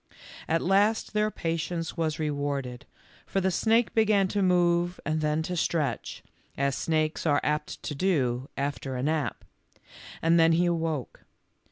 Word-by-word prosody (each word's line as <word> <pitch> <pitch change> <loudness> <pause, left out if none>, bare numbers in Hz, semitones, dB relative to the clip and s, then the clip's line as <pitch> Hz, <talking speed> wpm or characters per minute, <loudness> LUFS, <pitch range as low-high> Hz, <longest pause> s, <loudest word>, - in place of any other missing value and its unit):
At 165 +1 +1
last 205 +5 +2
their 210 0 +2
patience 165 -2 -3
was 160 -2 -1
rewarded, 145 -5 -3 0.4
for 195 - 0
the 190 0 +1
snake 225 +5 +2
began 210 -3 +3
to 205 - 0
move 175 -1 +2
and 155 0 0
then 150 +1 0
to 180 +3 -3
stretch, 155 -8 -2 0.3
as 140 0 +1
snakes 155 0 -1
are 145 -2 +4
apt 150 0 -2
to - - -3
do 135 -6 0
after 140 -1 -3
a 125 - -3
nap, 155 0 -1 0.7
and 165 +1 +3
then 165 0 +5
he 175 +2 +3
awoke. 165 -5 -2
165 Hz, 150 wpm, -27 LUFS, 145-180 Hz, 0.7 s, then